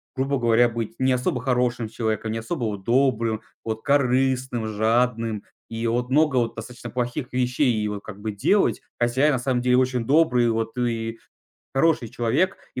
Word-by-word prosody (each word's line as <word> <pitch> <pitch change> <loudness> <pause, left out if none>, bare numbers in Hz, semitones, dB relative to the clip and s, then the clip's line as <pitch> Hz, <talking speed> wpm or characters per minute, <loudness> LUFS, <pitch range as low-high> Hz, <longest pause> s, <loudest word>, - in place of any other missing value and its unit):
грубо 135 +1 0
говоря, 120 -1 +4
быть 115 -1 -4
не 130 0 +2
особо 125 0 -1
хорошим 125 -2 0
человеком, 110 -1 -2
не 115 - -2
особо 120 +3 -3
вот 100 -3 -4
добрым, 115 -2 +1 0.2
вот 110 -1 -4
корыстным, 130 -3 +1
жадным, 115 0 0 0.3
и 115 0 -3
вот 120 +2 -1
много 145 0 +3
вот 115 -2 0
достаточно 120 +2 -8
плохих 125 0 -3
вещей 125 +1 +1
и 105 -1 -1
вот 105 -1 -5
как 105 -2 -9
бы 110 +1 -3
делать. 195 - +2 0.2
Хотя 120 +4 +2
я - - +4
на 130 - 0
самом 125 0 0
деле 125 0 +3
очень 125 -2 +1
добрый, 135 -3 +3
и - - +3
вот 115 +1 -2
и 115 -2 -2 0.6
хороший 135 -3 +2
человек. 125 - 0 0.2
И - - -4
120 Hz, 185 wpm, -24 LUFS, 115-130 Hz, 0.6 s, говоря